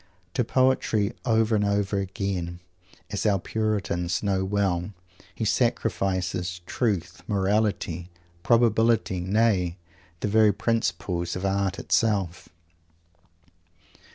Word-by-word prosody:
To 125 - +1
poetry, 120 -4 +2
over 110 -2 +3
and 105 - +2
over 100 0 +1
again, 95 -3 -3 0.5
as 100 - -2
our 100 -2 +3
Puritans 95 -4 -1
know 95 -2 +1
well, 95 -1 0 0.4
he - - -2
sacrifices 90 -2 0
Truth, 95 -6 -2
Morality, 100 -4 0 0.3
Probability, 115 -3 +3
nay! 95 -2 +1 0.4
the - - 0
very 105 0 +4
principles 85 -5 -1
of 90 +1 -3
Art 95 -1 0
itself. 100 -6 0
100 Hz, 100 wpm, -26 LUFS, 90-110 Hz, 0.5 s, very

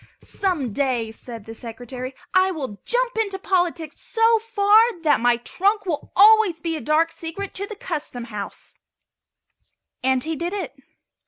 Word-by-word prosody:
"Some 320 - -2
day," 245 -4 0
said 230 -1 -10
the 225 - -8
Secretary, 245 +3 -7 0.2
"I 375 0 +4
will 265 - -5
jump - - +1
into 400 -3 0
politics 350 -5 -1
so 455 0 +3
far 440 -1 +4
that 300 -6 +4
my 240 0 +3
trunk 395 - 0
will 310 -5 -3
always 420 -4 +6
be 330 0 -2
a 310 - -5
dark 320 +2 +2
secret 335 +5 -6
to 400 +1 -4
the 430 - -7
Custom 300 - -5
Housers!" 210 -4 -7 1.2
And 260 0 +2
he 320 0 -2
did 340 +4 -3
it. 375 -10 -4
330 Hz, 155 wpm, -23 LUFS, 255-400 Hz, 1.2 s, always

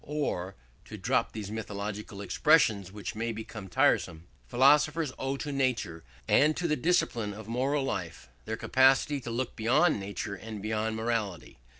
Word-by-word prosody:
Or 100 -11 -3 0.3
(to - - -9
drop - - 0
these 105 -2 -6
mythological 105 -1 -5
expressions 105 - +3
which 105 +1 -6
may 115 +1 -2
become 110 -2 -7
tiresome) 85 -2 +1 0.2
philosophers 145 - +3
owe 135 +1 -2
to 145 - -4
nature 125 - -1 0.2
and 150 +1 +4
to 175 - 0
the 150 - +2
discipline 120 - 0
of 110 0 -10
moral 135 +5 0
life 90 - -4 0.2
their - - -3
capacity 135 +2 +3
to 120 - -6
look 120 +2 -3
beyond 130 +6 +3
nature 100 +1 -5
and 110 +2 -7
beyond 110 +1 -2
morality. 110 - -3
115 Hz, 155 wpm, -29 LUFS, 100-135 Hz, 0.3 s, and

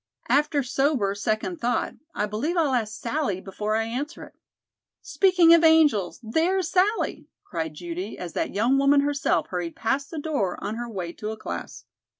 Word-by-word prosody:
After 290 0 +2
sober, 255 -5 +1
second 215 - -2
thought, 245 +1 0 0.2
I 210 - 0
believe 240 - -2
I'll 305 -5 +2
ask 215 -4 -1
Sallie 235 -6 -1
before 210 +3 -3
I 225 - +1
answer 265 +8 -5
it." - - -13 0.7
"Speaking 345 +1 +5
of 335 0 +6
angels 310 - +4
there 320 +12 +1
is 370 -4 -2
Sallie!" 395 +4 +1 0.2
cried 160 -3 -4
Judy, 175 +5 -6
as 175 -3 -7
that - - -2
young 240 +6 +3
woman 280 +1 +5
herself 285 0 0
hurried 175 -2 -4
past 270 +5 -1
the 325 - -7
door 290 - -1
on - - -4
her 240 0 -5
way 180 -6 -5
to 210 - -6
a 220 - -5
class. - - -7
245 Hz, 175 wpm, -25 LUFS, 205-305 Hz, 0.7 s, of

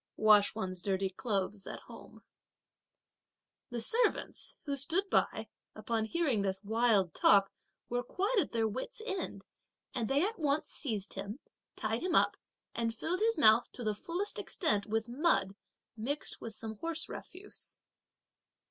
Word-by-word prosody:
(wash 210 -1 +6
one's 185 -4 -4
dirty 195 0 0
clothes 200 -2 -2
at - - -6
home). - - -13 1.5
The 240 -2 -3
servants 455 - +1
who 285 -2 -1
stood 335 +9 0
by, - - +2 0.3
upon 225 -2 -1
hearing 275 -5 +1
this 195 0 -2
wild 215 -5 +3
talk, 195 -1 +5 0.4
were 245 0 -1
quite 400 - -1
at 335 - 0
their 225 -1 +1
wits' 260 - -5
end, 390 -5 -4 0.5
and 230 - -1
they 280 +4 +3
at 440 0 -3
once 295 -1 +1
seized 215 -9 -2
him, 200 +4 -5 0.4
tied 220 +1 -1
him 360 -1 0
up, - - +4 0.4
and 230 -1 -1
filled 345 +10 -2
his 455 +2 +2
mouth 220 +2 +6
to 245 - -7
the 215 -1 +1
fullest 345 - -3
extent 210 - 0
with 220 +1 -1
mud 240 - +2 0.4
mixed 270 +7 -2
with 225 -2 -6
some 220 -1 -6
horse 330 -1 -1
refuse. 385 +3 -6
230 Hz, 150 wpm, -33 LUFS, 210-325 Hz, 1.5 s, wash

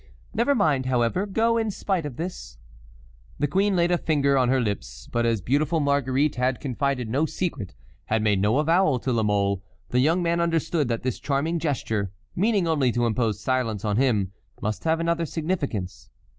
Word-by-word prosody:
Never 235 +6 +2
mind, 145 - +2
however, 130 - +1
go, 225 +3 +2
in 220 -1 0
spite 190 -5 -2
of 135 - -8
this." 165 - -6 0.8
The 145 - +1
queen 195 +7 +1
laid 175 0 +2
a 175 - +2
finger 140 -3 +2
on 130 -2 +3
her 130 0 +3
lips. - - -4
But 120 0 +1
as 115 -3 +1
beautiful 150 +7 +1
Marguerite 140 -1 +1
had 125 0 0
confided 135 -2 -1
no 140 +8 +1
secret, 145 - -4 0.3
had 110 0 0
made 105 -3 +2
no 105 +5 +2
avowal 155 -1 +3
to 130 +1 -2
La 115 - +2
Mole, 100 -2 +1 0.3
the 125 - +1
young 165 +7 +3
man 170 0 +1
understood 165 -3 0
that 115 -1 -2
this 130 -1 -2
charming 155 +4 -1
gesture, 110 - -1 0.2
meaning 200 -2 +2
only 145 -6 +2
to 120 0 +1
impose 110 -2 0
silence 115 -4 -1
on 105 -1 0
him, 110 -8 +2 0.3
must 105 +7 -3
have 160 0 +2
another 170 0 0
significance. 140 - -3
140 Hz, 185 wpm, -25 LUFS, 115-165 Hz, 0.8 s, on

